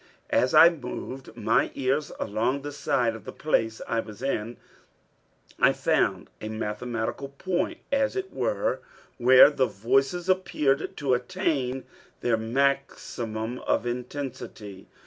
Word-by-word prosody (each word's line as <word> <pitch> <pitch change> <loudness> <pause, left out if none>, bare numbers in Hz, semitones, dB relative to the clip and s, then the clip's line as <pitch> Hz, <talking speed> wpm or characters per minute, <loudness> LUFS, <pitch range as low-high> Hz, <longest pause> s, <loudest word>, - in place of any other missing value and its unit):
As 125 - +3
I 165 - +10
moved 135 -4 -7
my - - +2
ears 135 +3 0
along 115 +6 -1
the 145 - -5
side 125 -4 0
of 115 - -10
the - - -7
place 115 -7 0
I 115 - 0
was 110 +1 -7
in, 120 -3 -2 1.0
I - - +5
found - - 0
a 110 - -4
mathematical 110 +4 -3
point 185 - -2
as 275 +2 +1
it 385 0 -4
were, - - 0 0.4
where 130 +4 +8
the 130 -3 +1
voices 135 - 0
appeared 170 -7 +1
to 140 -3 +1
attain 130 -1 -1 0.4
their 120 -2 +2
maximum 120 -1 -1
of - - 0
intensity. 120 -5 -6
130 Hz, 125 wpm, -26 LUFS, 115-145 Hz, 1.0 s, I